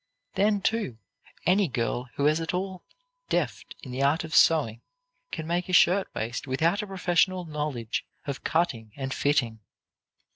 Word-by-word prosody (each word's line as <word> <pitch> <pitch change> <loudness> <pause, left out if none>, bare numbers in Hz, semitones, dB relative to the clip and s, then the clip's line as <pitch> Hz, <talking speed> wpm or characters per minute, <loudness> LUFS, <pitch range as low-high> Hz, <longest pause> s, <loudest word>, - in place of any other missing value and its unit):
Then, 205 0 +2
too, 210 - -1 0.5
any 190 +2 +4
girl 120 -1 -2
who 140 - 0
is 155 +2 +3
at 165 +2 -2
all 185 0 -3 0.5
deft - - -2
in 130 - -7
the 130 +2 -3
art 145 +5 +3
of 160 -1 -7
sewing 120 -9 +4 0.5
can 160 - -4
make 175 +2 -1
a - - -3
shirt 185 +2 +5
waist 120 +4 -3
without 165 +9 +1
a 210 - -6
professional 185 -1 +1
knowledge 150 -7 -3 0.2
of 140 -2 -5
cutting 120 -10 0
and 135 -1 -3
fitting. 130 -6 +1
155 Hz, 155 wpm, -27 LUFS, 130-180 Hz, 0.5 s, shirt